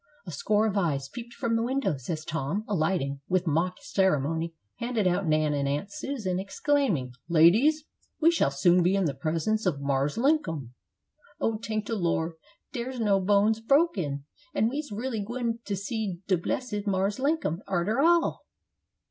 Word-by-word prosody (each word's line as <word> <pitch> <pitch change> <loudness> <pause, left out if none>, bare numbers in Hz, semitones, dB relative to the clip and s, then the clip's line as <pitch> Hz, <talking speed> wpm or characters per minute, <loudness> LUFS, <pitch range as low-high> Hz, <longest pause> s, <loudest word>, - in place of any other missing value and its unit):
A 175 - -6
score 210 +8 +1
of 215 -2 0
eyes 140 -7 0
peeped 235 - -9
from 230 -1 0
the 225 - +1
windows 230 - -1
as 155 -2 -3
Tom, 165 +6 -2
alighting, 155 -7 0
with 185 0 +1
mock 170 +3 +1
ceremony 165 -2 0 0.2
handed 235 -3 -1
out 180 0 +1
Nan 155 -1 +2
and 140 -1 0
Aunt 145 +8 -2
Susan, 240 -12 -3
exclaiming, 195 - 0 0.2
"Ladies, 215 - +5 0.4
we 330 +1 +5
shall 330 - +2
soon 175 +6 +3
be 180 +3 +3
in 195 -2 +2
the 145 - 0
presence 165 +10 -1
of 150 -6 0
'Marse 140 0 0
Linkum.'" 175 - 0 0.7
"Oh, 220 -1 0
tank 215 -1 -3
de 230 - -3
Lor', 170 -3 0 0.4
dar's 250 0 -4
no 205 -3 +3
bones 205 +3 +3
broken! 220 - +1 0.3
and 220 - +3
we's 290 -1 -4
really 225 +2 -3
gwine 235 +1 -2
to 200 - -2
see 200 -2 -3
de 190 - +3
blessed 210 +4 -3
Marse 195 +3 0
Linkum, 275 - 0
arter 195 +6 0
all!" 340 +2 +2
195 Hz, 165 wpm, -27 LUFS, 160-230 Hz, 0.7 s, Ladies